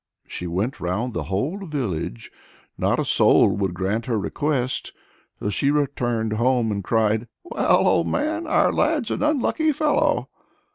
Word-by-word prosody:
She 90 - -6
went 100 - -2
round 110 +8 -2
the 80 -3 -3
whole 130 - -2
village; 110 - -4 0.4
not - - 0
a - - 0
soul - - +4
would 95 -3 -1
grant 100 +6 -2
her 115 -3 0
request. 130 +4 -2 0.5
So 105 - -2
she 140 +8 +1
returned 120 -6 0
home 120 0 +1
and 100 -1 -3
cried 110 +2 +1 0.2
"Well, 350 - +2
old - - +3
man! 315 +2 -1
our - - +3
lad's 300 -7 +1
an - - -2
unlucky 305 +2 +1
fellow!" 300 +1 +1
120 Hz, 150 wpm, -23 LUFS, 100-155 Hz, 0.5 s, soul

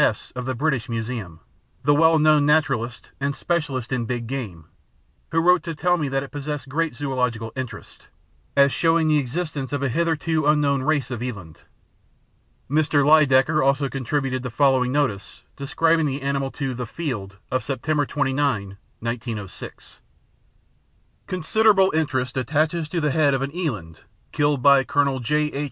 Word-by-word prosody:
S., - - 0
of 125 0 -6
the 130 - -2
British 140 -3 -1
Museum, 110 -8 -5 0.4
the 145 - +4
well 160 +2 +5
known 155 -1 +4
naturalist 145 -6 0
and 140 0 -1
specialist 140 -7 -2
in 125 -3 -1
big 120 0 -3
game, 110 - -6 0.6
who 165 - -3
wrote 180 +2 +4
to 165 -1 -5
tell 180 +4 +2
me 150 -5 -2
that 135 0 -1
it 140 - -10
possessed 145 -1 -5
great 155 0 -1
zoological 125 -5 -2
interest, 130 -2 -8 0.5
as 140 0 +6
showing 165 -1 +2
the 155 -1 +4
existence 145 0 -4
of 145 -1 -2
a 135 - +1
hitherto 160 +1 0
unknown 145 -2 +3
race 140 -3 0
of 120 -2 -4
eland. 100 -11 -7 1.1
Mr. 145 0 +2
Lydekker 150 -1 +4
also 140 0 +2
contributed 135 0 -2
the 125 - -4
following 130 0 +2
notice 130 -9 -2
describing 160 +3 +1
the 140 0 -4
animal 140 -1 -1
to 135 -1 -4
The 125 -1 -5
Field 105 - -5
of 130 -2 0
September 145 +3 -1
29, 135 -8 -1 0.2
1906: 115 -4 -6 1.3
"Considerable 190 +2 +3
interest 135 -5 -1
attaches 155 +5 0
to 175 - -1
the 150 -2 +1
head 145 -1 +3
of 135 - -1
an 140 +4 -5
eland, 105 - -4 0.3
killed 145 -3 +1
by 140 -1 +6
Colonel 140 0 +1
J.H. 150 +5 0
140 Hz, 155 wpm, -23 LUFS, 125-155 Hz, 1.3 s, as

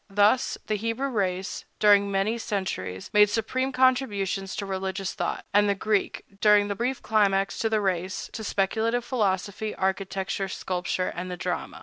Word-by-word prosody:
Thus, 205 +5 +3
the 215 - -1
Hebrew 230 +6 -2
race, 190 -5 -2
during 205 -1 +5
many 200 +4 0
centuries, 190 - -4
made 210 0 +6
supreme 255 +5 -1
contributions 215 -7 +1
to 200 - -3
religious 190 0 -3
thought; - - -3
and 205 0 +4
the 200 - +2
Greek, 210 +1 0 0.2
during 210 -1 +5
the 200 - -1
brief 245 +5 -2
climax 195 -2 +2
of 225 - +2
the 220 -1 +2
race, 185 -1 -2
to 220 - -5
speculative 220 +4 0
philosophy, 210 -3 -1
architecture, 190 0 -2
sculpture, 185 -1 -2
and 180 +1 -4
the 180 - -5
drama. 180 0 -4
200 Hz, 155 wpm, -26 LUFS, 190-220 Hz, 0.2 s, made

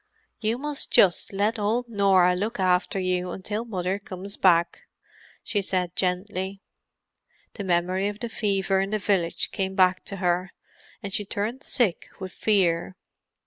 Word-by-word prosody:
"You 225 +1 0
must 295 +1 -1
just 180 -3 +4
let 210 +3 0
old 225 +4 0
Norah 195 -5 +4
look 210 +4 -3
after 185 +1 +2
you 180 -1 -1
until 210 +5 -4
Mother 190 -3 -2
comes 200 0 -8
back," 170 -2 +3 0.6
she 205 -4 0
said 180 -2 -2
gently. 190 +1 -2 0.9
The 205 - -6
memory 185 +2 +1
of 205 0 -5
the 235 - -3
fever 195 -4 0
in 195 +1 0
the 215 - 0
village 185 -4 0
came 190 -1 -3
to 185 +2 +2
her, 180 -1 0 0.5
and 200 -1 -5
she 205 - 0
turned 210 +6 -3
sick 220 -11 0
with 190 -1 -6
fear. 185 -4 +1
195 Hz, 145 wpm, -25 LUFS, 180-210 Hz, 0.9 s, just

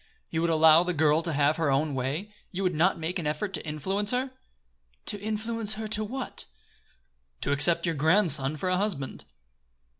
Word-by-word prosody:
"You 160 - -1
would 170 - +1
allow 160 0 +6
the 180 0 -2
girl 155 +1 +3
to 165 - -3
have 150 +1 +2
her 160 -3 +1
own 140 +2 +1
way? 145 +11 -3 0.2
You 195 +1 -3
would 180 -1 +1
not 170 +5 +2
make 170 +3 -3
an 160 - -3
effort 155 +7 -2
to 155 - -4
influence 190 +7 -2
her?" 255 +2 0 0.7
"To 205 - -3
influence 220 0 -2
her 220 0 -5
to 215 0 0
what?" 255 +4 -4 1.0
"To - - -1
accept 145 +4 +2
your 170 - 0
grandson 155 -2 +3
for 185 - -3
a 185 - +2
husband." 185 -9 -3
170 Hz, 185 wpm, -27 LUFS, 150-205 Hz, 1.0 s, allow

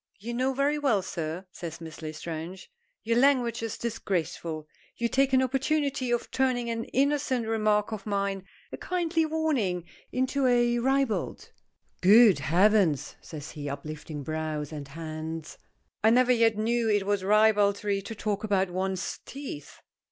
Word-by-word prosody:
"You 225 +4 -6
know 260 +2 0
very 285 +2 +1
well, 235 -10 +2
sir," 170 0 -4
says 170 -3 -7
Miss 160 -1 -9
L'estrange. 160 - -6 0.3
"Your 230 +1 +2
language 250 -4 +3
is 225 -2 -4
disgraceful. 170 -8 -3 0.3
You 235 - 0
take 270 +3 +2
an 260 0 +4
opportunity 270 0 0
of 240 0 -1
turning 250 -3 0
an 230 0 -3
innocent 275 -3 +1
remark 215 -1 +1
of 215 -1 -6
mine, 200 -1 -1 0.3
a - - -6
kindly 340 -3 0
warning, 280 - 0 0.3
into 260 +1 +1
a 240 -1 +3
ribald 265 -2 0 0.2
" - - -49
"Good 210 +1 +7
heavens!" 185 -3 +3
says 150 -2 -8
he, 145 -2 -6
uplifting 150 +1 -6
brows 155 -1 -3
and 145 -3 -6
hands. 160 +1 -6 0.4
"I 220 - +6
never 250 +2 +4
yet 230 -3 +3
knew 230 +1 +1
it 205 -2 +2
was 205 -1 0
ribaldry 205 -1 +3
to 225 +3 -7
talk 210 -1 -2
about 195 -3 +1
one's 190 +1 -2
teeth." 265 - -8
215 Hz, 150 wpm, -28 LUFS, 175-250 Hz, 0.4 s, Good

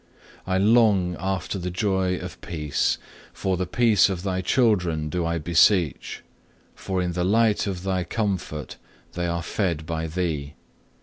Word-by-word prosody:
2. - - -3
I - - +3
long 100 -4 +4
after 95 0 -2
the 90 0 -3
joy 95 -1 0
of - - -8
peace; 75 -4 -1 0.4
for 95 -1 -1
the 90 0 -2
peace 110 -3 +4
of 95 -2 -4
Thy 95 -2 -1
children 90 - +1
do 85 +2 -1
I 85 0 -1
beseech, 85 0 +2 0.5
for 95 -1 -3
in 90 - -1
the 90 +1 -1
light 105 +2 +2
of 95 -2 -4
Thy 95 -1 0
comfort 90 - -3 0.4
they 90 0 -2
are 85 0 -2
fed 85 -5 -2
by 80 -1 -3
Thee. 80 -4 -3
90 Hz, 160 wpm, -24 LUFS, 85-95 Hz, 0.5 s, long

